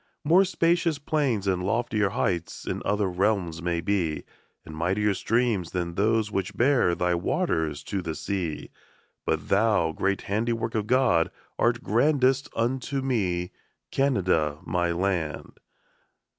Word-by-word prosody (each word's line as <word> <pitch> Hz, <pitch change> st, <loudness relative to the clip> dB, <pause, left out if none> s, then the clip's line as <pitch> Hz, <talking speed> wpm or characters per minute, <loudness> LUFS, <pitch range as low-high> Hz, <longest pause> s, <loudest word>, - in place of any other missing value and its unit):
More 170 Hz, +6 st, +5 dB
spacious 170 Hz, -3 st, +1 dB
plains 140 Hz, -8 st, 0 dB
and 95 Hz, -2 st, +1 dB
loftier 105 Hz, 0 st, 0 dB
heights 85 Hz, -4 st, -2 dB
In -, -, -3 dB
other 105 Hz, -1 st, +1 dB
realms 90 Hz, -3 st, 0 dB
may 85 Hz, -1 st, -1 dB
be, 85 Hz, -4 st, -1 dB, 0.4 s
And 80 Hz, -, -9 dB
mightier 95 Hz, +6 st, +1 dB
streams 110 Hz, -5 st, 0 dB
than 85 Hz, -2 st, -2 dB
those 110 Hz, +3 st, +1 dB
which 95 Hz, -2 st, -3 dB
bear 120 Hz, -9 st, +3 dB
Thy 90 Hz, 0 st, +1 dB
waters 85 Hz, -, -1 dB
to 100 Hz, -, -3 dB
the 80 Hz, -3 st, -4 dB
sea; 90 Hz, -6 st, -4 dB, 0.6 s
But -, -, -1 dB
thou, 100 Hz, -5 st, +3 dB
great 100 Hz, +4 st, -1 dB
handiwork 115 Hz, +2 st, -1 dB
of 105 Hz, -2 st, -1 dB
God, 125 Hz, -10 st, +3 dB, 0.3 s
Art 120 Hz, 0 st, +2 dB
grandest 135 Hz, +4 st, +2 dB
unto 130 Hz, +3 st, -1 dB
me, 90 Hz, -9 st, -1 dB, 0.4 s
Canada, 90 Hz, -, +1 dB
my 85 Hz, -1 st, 0 dB
land. 85 Hz, -3 st, -2 dB
100 Hz, 130 wpm, -26 LUFS, 90-120 Hz, 0.6 s, More